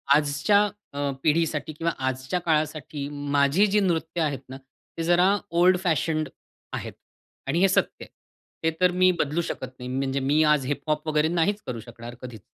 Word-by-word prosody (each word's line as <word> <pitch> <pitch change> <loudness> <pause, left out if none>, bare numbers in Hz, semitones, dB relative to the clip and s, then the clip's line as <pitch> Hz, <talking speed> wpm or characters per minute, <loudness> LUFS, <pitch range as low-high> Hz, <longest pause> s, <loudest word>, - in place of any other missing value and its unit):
आजच्या 150 +8 +3 0.3
अ, 140 0 -1
पिढीसाठी 155 0 +1
किंवा 165 +2 -1 0.2
आजच्या 130 +7 -2
काळासाठी 155 -3 -1 0.3
माझी 140 +8 +4
जी 210 +1 +2
नृत्य 165 -3 0
आहेत 145 -4 0
ना, 130 - -7
ते 135 +4 -10
जरा 180 +4 +4 0.3
ओल्ड 185 +1 +6
फॅशंड 155 -2 0 0.4
आहेत - - -5 0.5
आणि 165 +5 +1
हे 195 - +5
सत्य - - 0
आहे. - - -20 0.6
हे - - +3
तर 180 -1 +5
मी 185 +1 +4
बदलू 155 +4 0
शकत 130 -5 -5
नाही. 125 - -6
म्हणजे 135 +1 -1
मी 145 +4 +2
आज 150 -3 +2
हिप-हॉप 150 +2 -2
वगैरे 155 0 +2
नाहीच 205 +5 +1
करू 120 -2 -4
शकणार 120 +1 -10
कधीच. 120 -5 -9
155 Hz, 165 wpm, -25 LUFS, 135-170 Hz, 0.6 s, ओल्ड